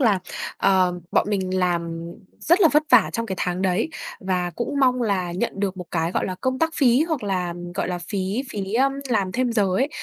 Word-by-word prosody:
là, 220 -7 +4 0.4
ờ, 185 -2 +2
bọn - - +2
mình 185 -2 -1
làm 170 -2 -1 0.3
rất 345 +5 +3
là 330 - +7
vất 300 +1 +5
vả - - +6
trong 230 -1 -2
cái 190 - -3
tháng 180 +1 -1
đấy 190 - +1 0.3
và 180 -2 -1
cũng 235 - -4
mong 250 -1 +3
là 190 -5 0
nhận 195 +7 -1
được 195 -2 -1
một 180 -2 -7
cái, 165 +1 -1
gọi - - 0
là, 185 - -3
công 260 0 -1
tác 325 +2 +2
phí, 255 0 +4
hoặc 315 -7 -1
là, 180 -4 -1 0.2
gọi - - -1
là, 180 -1 -2
phí 195 +6 -2
phí, 195 -2 -4
ơm, 270 +2 +3 0.2
làm 200 -6 0
thêm 250 +1 0
giờ 215 -3 +3
ấy. 265 +6 +2
195 Hz, 220 wpm, -23 LUFS, 180-245 Hz, 0.4 s, là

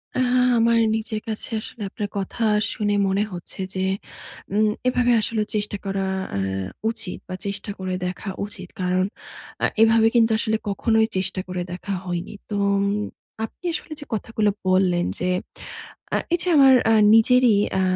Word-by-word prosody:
আ - - 0 0.4
আমার 230 0 +4 0.2
নিজের 220 0 -2
কাছে 220 -1 -4
আসলে 235 - -9
আপনার 205 +1 -4
কথা 200 +4 -3 0.3
শুনে 205 -1 0
মনে 195 +2 +1
হচ্ছে 175 +2 -8 0.2
যে 190 0 0 0.7
উম 215 +1 +3 0.2
এভাবে 245 -1 +3
আসলে 220 +1 -1
চেষ্টা 205 -1 -1
করা 195 0 -1 0.3
অ্যাঁ 95 -1 -2 0.2
উচিত 205 -5 -2
বা, 185 - -5
চেষ্টা 200 +1 -3
করে 185 -1 -3
দেখা 180 +3 -4 0.2
উচিত। 195 -4 -9
কারণ, 185 +1 +1 0.6
আ - - +6 0.2
এভাবে 225 0 +6
কিন্তু 230 -1 +5
আসলে 220 -1 +1
কখনোই 220 +2 +2
চেষ্টা 185 0 -1
করে 180 -1 -3
দেখা 195 +3 -4
হয়নি। 175 +2 -4 0.2
তো 210 - -3 0.2
উম 200 - +1 0.6
আপনি 225 - -17
আসলে 325 -2 -5
যে 290 - -8
কথাগুলো 215 -1 0 0.2
বললেন 185 -2 +3
যে, 180 - 0 0.9
আ - - +3 0.2
এইযে 355 +1 +2
আমার 270 -2 +8 0.2
আ - - +5 0.2
নিজেরই 245 0 +5 0.2
আ - - +3
205 Hz, 155 wpm, -23 LUFS, 185-225 Hz, 0.9 s, আমার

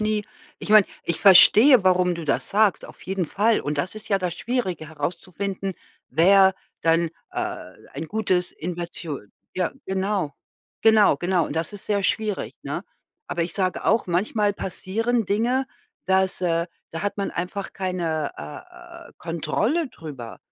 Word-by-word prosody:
nie 215 -1 0 0.3
ich - - -6
meine, 215 -2 +7 0.2
ich 170 - 0
verstehe, 210 +4 +8
warum 180 -1 +3
du 170 - -6
das 140 - -1
sagst, 210 -1 +2
auf - - -15
jeden 185 -3 -2
Fall. 215 +6 +2
Und 145 0 -3
das 175 +8 -2
ist 215 0 -9
ja 195 -2 +2
das 180 -2 -2
Schwierige 190 -9 -3
herauszufinden, 185 +5 -4 0.3
wer 190 +6 +5 0.3
dann, 165 0 +2 0.2
äh, - - -4 0.2
ein 155 +4 -6
gutes 185 -5 0
Invertio 170 -3 -5 0.4
ja, 180 -2 0
genau. 190 -5 -1 0.5
Genau 220 -8 +5
genau. 175 +1 0
Und - - -6
das 165 +5 -2
ist 205 - -7
sehr 205 -1 0
schwierig, 210 +1 -1
ne? - - -5 0.4
Aber 170 - -1
ich 165 0 -5
sage 185 -2 -1
auch, 225 - +2
manchmal 205 +4 +1
passieren 220 +5 -2
Dinge, 245 +6 +1 0.4
dass, 190 0 +1
äh 170 -1 0 0.3
da 165 - -4
hat 205 - -2
man 200 - -1
einfach 185 +3 -4
keine, 170 -5 -2
äh, 345 - -11
äh, - - -18
Kontrolle 205 - -1
drüber. 145 - -9
190 Hz, 155 wpm, -23 LUFS, 170-210 Hz, 0.5 s, verstehe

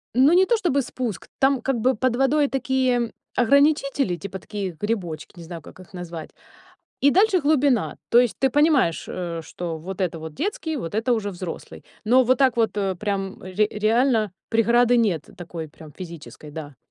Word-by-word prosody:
Ну, 270 +5 +6
не 375 +1 +6
то 470 +1 +2
чтобы 305 -9 +1
спуск. 240 -5 -5
Там 270 -1 +3
как 270 -1 0
бы 255 +2 +2
под 250 +1 0
водой 285 +2 +3
такие 260 -3 0 0.2
ограничители, 275 - +3
типа 190 +2 -7
такие 195 -1 -5
грибочки, 195 -7 -3
не - - -8
знаю, 165 -1 -8
как - - -14
их 185 - -14
назвать, 170 -3 -7 0.7
и 285 - +6
дальше 390 0 +4
глубина. 285 -5 +2
То 235 - +5
есть 245 -3 0
ты 265 - +3
понимаешь, 290 - +2
э, 170 -2 -4
что 170 -1 -5
вот 185 +4 -7
это 175 -3 -1
вот 160 -1 -7
детский, 320 -3 -3
вот 165 -7 -5
это 225 +3 +1
уже 215 -3 0
взрослый. 180 -2 -8 0.2
Но 250 +3 +5
вот 255 +1 +3
так 260 -3 +3
вот, 225 -1 +2
э, 195 -2 0
прям 195 -1 -3
ре 200 +3 0
реально 220 0 +2 0.2
преграды 235 +2 +3
нет 195 -10 +1
такой 165 -2 -7
прям 150 0 -14
физической, 165 -3 -10
да. 145 -3 -8
225 Hz, 180 wpm, -23 LUFS, 180-265 Hz, 0.7 s, Ну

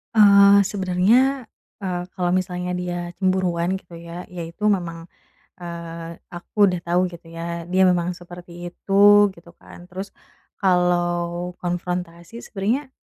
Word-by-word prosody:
Eee, 200 -1 +7
sebenernya, 210 +8 +2 0.3
eee, 180 -3 -3
kalau 175 -1 +1
misalnya 180 -1 -2
dia 175 -1 -4
cemburuan 185 -1 +1
gitu 175 -2 -17
ya, 170 +1 -8
ya 180 -1 -8
itu 170 +5 -5
memang, 175 -5 0 0.6
eee, 170 -1 -7 0.2
aku 190 +4 +1
udah 180 -1 -2
tau 175 +1 +2
gitu 170 -2 -9
ya 170 0 -5
dia 185 +1 +3
memang 180 -1 +2
seperti 175 0 -12 0.2
itu. 205 +1 +5
gitu 170 0 -16
kan, 175 - -14
terus 190 +2 -6 0.5
kalau 175 -1 +1
konfrontasi 175 +3 -4
sebenernya 230 +8 -2
180 Hz, 130 wpm, -22 LUFS, 175-195 Hz, 0.6 s, Eee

